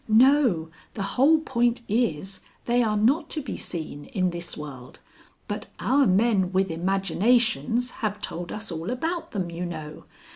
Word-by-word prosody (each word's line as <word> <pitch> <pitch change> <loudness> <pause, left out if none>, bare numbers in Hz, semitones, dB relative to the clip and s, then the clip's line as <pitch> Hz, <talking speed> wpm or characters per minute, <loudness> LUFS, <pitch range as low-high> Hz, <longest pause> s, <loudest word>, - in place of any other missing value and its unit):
"No, 225 - +4 0.2
the 200 - -2
whole 310 +5 +5
point 240 -5 +1
is 195 -4 -1 0.3
they 240 +1 +3
are 215 -3 +1
not 240 +9 +2
to 315 - -2
be 290 - -5
seen 155 -4 -5
in 185 -3 0
this 170 0 -5
world. 135 -4 -9 0.5
But - - -4
our 275 -1 +3
men 195 -1 +3
with 190 -1 +1
imaginations 195 - +1
have 210 -2 -1
told 175 -4 -5
us 215 -2 -5
all 165 +3 -4
about 325 +8 -2
them, 185 -5 -3
you 170 +1 -4
know. 155 -3 -7
200 Hz, 155 wpm, -25 LUFS, 170-240 Hz, 0.5 s, whole